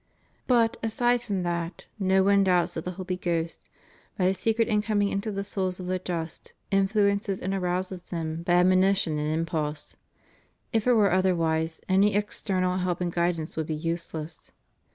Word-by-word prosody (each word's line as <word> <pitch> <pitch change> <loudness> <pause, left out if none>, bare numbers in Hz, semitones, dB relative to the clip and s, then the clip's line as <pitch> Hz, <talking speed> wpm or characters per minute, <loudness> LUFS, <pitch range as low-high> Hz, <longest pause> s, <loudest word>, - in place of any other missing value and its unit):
But, 235 -2 +3
aside 240 +2 +1
from 200 -6 -2
that, 170 0 -3
no 190 0 +3
one 200 0 +4
doubts 180 -2 +2
that 165 - -5
the 180 - -3
Holy 185 0 -4
Ghost, 170 -2 -2 0.5
by 185 - +1
His 190 0 +1
secret 225 +2 +1
incoming 210 -2 +1
into 200 +3 -2
the 200 0 -3
souls 190 -2 -2
of 180 - -6
the 185 0 -1
just, 170 -3 -5 0.2
influences 200 0 +2
and 190 +1 -2
arouses 185 0 -2
them 165 -2 -4
by 175 +1 0
admonition 185 -2 +3
and 150 +1 -1
impulse. 155 -2 -2 0.8
If 225 +1 +1
it 250 - +6
were 210 -4 +4
otherwise, 165 -3 +1
any 195 +2 +3
external 185 -3 0
help 180 -1 -1
and 175 -1 -2
guidance 170 -2 -1
would 160 -1 -2
be 155 - -2
useless. 165 0 -4
185 Hz, 165 wpm, -27 LUFS, 170-200 Hz, 0.8 s, it